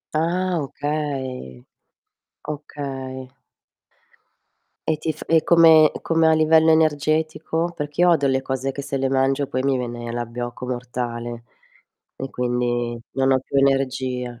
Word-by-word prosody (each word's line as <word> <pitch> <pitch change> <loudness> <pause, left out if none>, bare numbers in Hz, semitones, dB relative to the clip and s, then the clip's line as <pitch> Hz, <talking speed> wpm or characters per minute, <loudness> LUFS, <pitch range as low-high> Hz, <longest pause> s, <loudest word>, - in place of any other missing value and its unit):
Ah, 180 +3 0
okay. 135 - -4 0.8
Okay. 135 -3 -6 1.6
E 160 - +3
ti 160 +1 -2
f 155 - -10
e 165 -1 +4
come 160 -2 +7
come 165 -1 +2
a - - +5
livello 160 0 +5
energetico? 160 +2 +1
Perché 145 0 -6
io 175 - +5
odio 140 -5 +3
le 130 0 +1
cose 130 0 -2
che 140 - -6
se 140 0 -5
le 135 0 0
mangio 135 +1 +1
poi 130 - -2
mi 135 -1 +2
viene 120 -1 -5
l'abbiocco 120 +1 -5
mortale 120 -1 -4 0.7
e 135 0 -6
quindi 120 -1 -1
non 135 0 +2
ho 130 - +2
più 135 - -5
energia. 130 -3 0
135 Hz, 135 wpm, -22 LUFS, 125-155 Hz, 1.6 s, come